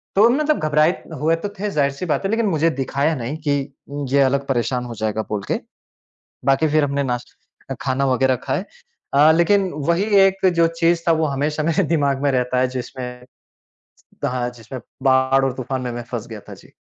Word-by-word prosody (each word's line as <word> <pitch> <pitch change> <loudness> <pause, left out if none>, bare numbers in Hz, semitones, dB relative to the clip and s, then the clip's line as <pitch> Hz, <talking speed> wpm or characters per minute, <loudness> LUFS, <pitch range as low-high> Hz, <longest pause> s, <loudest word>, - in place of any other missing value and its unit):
तो 210 +3 +6
मतलब 300 +4 +1
घबराए 155 +2 +4 0.3
हुए 160 +3 +2
तो 185 +5 -5
थे, 210 +1 -1
ज़ाहिर-सी 140 0 0
बात 170 +3 -1
है, - - 0
लेकिन 225 0 +1
मुझे 165 -4 +2
दिखाया 140 +2 -1
नहीं 130 +3 -4
कि 140 -1 0 0.2
उम, 145 0 -4
ये 140 +1 +3
अलग 140 +1 +2
परेशान 125 -1 -1
हो 120 -1 -7
जाएगा, 110 0 -1
बोल 105 -2 -3
के। - - +1 0.9
बाकी 135 +3 +3
फिर 155 0 +3
हमने 140 0 -1
नाश 125 -2 -2 0.5
अ, 135 - -1
खाना 135 +1 0
वग़ैरह 130 0 +2
खाए। - - -1 0.5
अ, 150 +3 +6
लेकिन 185 +4 +3 0.2
वही 170 +4 +2 0.2
एक 195 0 0
जो 170 0 +4
चीज़ 170 0 +3
था, - - +6
वो 160 -1 +1
हमेशा 150 +2 -1
मेरे 165 +4 +1
दिमाग 140 -3 +1
में 145 - +2
रहता 125 0 +1
है, 130 - +2
जिसमें 125 -1 -7 1.0
हाँ, 125 -1 -1
जिसमें 120 +2 -9 0.2
बाढ़ 130 0 +3
और 135 - 0
तूफान 130 0 -4
में 125 -1 -3
मैं 120 - -5
फँस 120 -2 -4
गया 110 -2 -8
था। - - -8
जी। - - -18
140 Hz, 200 wpm, -21 LUFS, 130-160 Hz, 1.0 s, तो